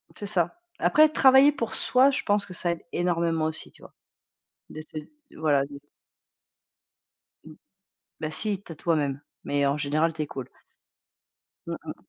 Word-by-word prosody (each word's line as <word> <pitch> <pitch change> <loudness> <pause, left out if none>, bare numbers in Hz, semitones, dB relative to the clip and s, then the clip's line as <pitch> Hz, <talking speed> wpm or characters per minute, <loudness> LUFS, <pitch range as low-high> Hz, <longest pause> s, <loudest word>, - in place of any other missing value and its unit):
C'est 205 - -6
ça. 200 - -1 0.2
Après 310 0 +5
travailler 270 -1 +6
pour 235 -6 -4
soi, 260 +2 +4
je 260 - -1
pense 205 -1 +1
que 185 - -10
ça 175 0 -1
aide 170 - -5
énormément 170 -2 0
aussi 160 0 -5
tu - - -20
vois, - - -14 0.8
de 155 - -8
te 155 0 -8 0.4
voilà, 145 -3 +2
de 140 0 -10 1.7
Mmh. - - -11 0.7
Ben 155 -1 -3
si, 200 +2 -2
tu 170 - -10
as - - -8
toi 165 +1 0
même, 140 -2 -2 0.2
mais 140 0 0
en 140 - +1
général 155 +3 +1
tu 155 - -4
es - - -3
cool. 130 -3 -7 1.2
Mmh - - -3
mh. - - -5
165 Hz, 170 wpm, -26 LUFS, 150-210 Hz, 1.7 s, travailler